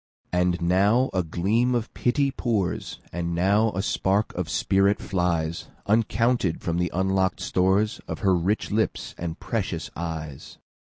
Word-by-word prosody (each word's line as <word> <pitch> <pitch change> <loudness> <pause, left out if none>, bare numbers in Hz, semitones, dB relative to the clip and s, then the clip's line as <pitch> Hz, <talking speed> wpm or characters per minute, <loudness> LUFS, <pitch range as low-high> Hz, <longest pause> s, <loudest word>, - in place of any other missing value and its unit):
And 90 0 +1
now 100 +9 +3
a 95 - +2
gleam 105 +9 +1
of 115 -2 -2
pity 140 +3 +1
pours, 110 -8 -2 0.2
And 85 0 -2
now 100 +5 +3
a 95 - -2
spark 100 +1 0
of 90 -3 -3
spirit 95 +6 +2
flies, 85 -3 -1 0.2
Uncounted, 115 -2 +2
from 85 0 -2
the 90 0 +1
unlock'd 95 0 +1
storesOf 95 +4 0
her 95 -4 +2
rich 95 +7 0
lips 110 +2 -1
and 85 -1 -4
precious 95 -7 -3
eyes. 80 -4 -6
95 Hz, 140 wpm, -25 LUFS, 85-110 Hz, 0.2 s, now